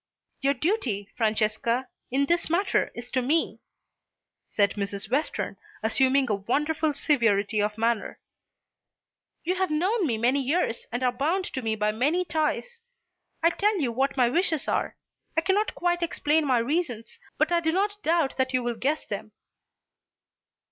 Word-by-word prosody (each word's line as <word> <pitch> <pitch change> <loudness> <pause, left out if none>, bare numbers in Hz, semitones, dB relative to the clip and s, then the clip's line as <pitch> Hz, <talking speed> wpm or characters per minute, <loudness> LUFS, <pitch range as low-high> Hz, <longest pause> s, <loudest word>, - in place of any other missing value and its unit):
"Your 275 +1 +2
duty, 250 - -1
Francesca, 220 +3 0 0.2
in 275 +3 +2
this 340 +3 0
matter 375 +4 +1
is 240 +1 -8
to 260 - +1
me," 300 +6 +1 0.9
said 200 -1 +2
Mrs. 200 0 -4
Western, 290 +4 -1 0.3
assuming 265 +4 +3
a 215 - +1
wonderful 300 +9 0
severity 225 -8 +2
of 210 +1 -1
manner. 230 0 -1 1.2
"You 355 - 0
have 375 0 0
known 365 +6 +1
me 230 -4 0
many 250 +5 +2
years 275 -3 0
and 245 +2 -2
are 250 - +3
bound 320 +10 0
to 260 - -2
me 220 -2 -1
by 210 0 +1
many 295 +12 +1
ties. 340 +10 -1 0.6
I 335 - +5
tell 415 +3 +1
you 260 -6 0
what 270 +4 0
my 250 -2 +5
wishes 320 +2 +1
are. - - -1 0.4
I - - +5
cannot 390 +4 +1
quite 350 0 0
explain 315 -2 +1
my 255 -2 +3
reasons, 245 -2 -2 0.2
but - - +2
I 345 - +4
do 320 -1 0
not 410 +3 0
doubt 325 -6 +1
that 260 -1 0
you 250 - +1
will 240 -1 -2
guess 290 +6 -1
them." - - -6
275 Hz, 160 wpm, -26 LUFS, 235-335 Hz, 1.2 s, I